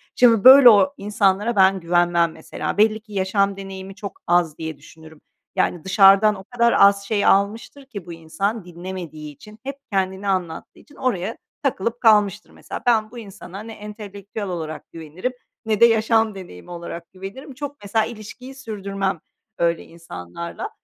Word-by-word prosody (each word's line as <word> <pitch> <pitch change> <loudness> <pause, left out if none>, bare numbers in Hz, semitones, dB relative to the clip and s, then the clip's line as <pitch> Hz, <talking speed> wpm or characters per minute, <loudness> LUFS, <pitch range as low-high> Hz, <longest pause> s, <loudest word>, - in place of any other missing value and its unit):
Şimdi 230 -4 +5
böyle 260 0 +10
o 240 +6 +5
insanlara 205 +2 +1
ben 190 -1 +4
güvenmem 170 -1 +2
mesela. - - -6
Belli 215 +1 +3
ki 215 -1 -16
yaşam 195 +1 0
deneyimi 195 0 -8
çok 205 -1 -8
az 175 -3 +2
diye 160 -2 -6
düşünürüm. 160 +1 -16 0.3
Yani 175 -3 0
dışarıdan 195 +2 +5
o 190 - -10
kadar 235 +2 +1
az 200 0 +5
şey 205 -1 0
almıştır 220 +8 +1
ki 210 -9 -9
bu 175 - -8
insan 175 +6 -3
dinlemediği 170 -4 -8
için, 210 +8 -15
hep 275 +1 -6
kendini 190 0 -1
anlattığı 180 -4 -3
için 290 - -20
oraya 225 -4 -2 0.3
takılıp 235 -3 -2
kalmıştır 210 -2 +3
mesela. - - -9
Ben 225 -2 +2
bu 245 - -11
insana 195 -3 -10
ne 225 0 -9
entelektüel 205 -1 -8
olarak 160 -4 -6
güvenirim 165 +9 -5 0.3
ne 215 -2 0
de 235 - +8
yaşam 225 -1 +2
deneyimi 175 - -11
olarak 170 -1 -8
güvenirim. 195 +9 -9
Çok 285 +2 -7
mesela 215 +2 +1
ilişkiyi 235 +4 -10
sürdürmem 200 -6 -4 0.4
öyle 170 -1 0
insanlarla. 165 - -8
200 Hz, 155 wpm, -21 LUFS, 175-220 Hz, 0.4 s, böyle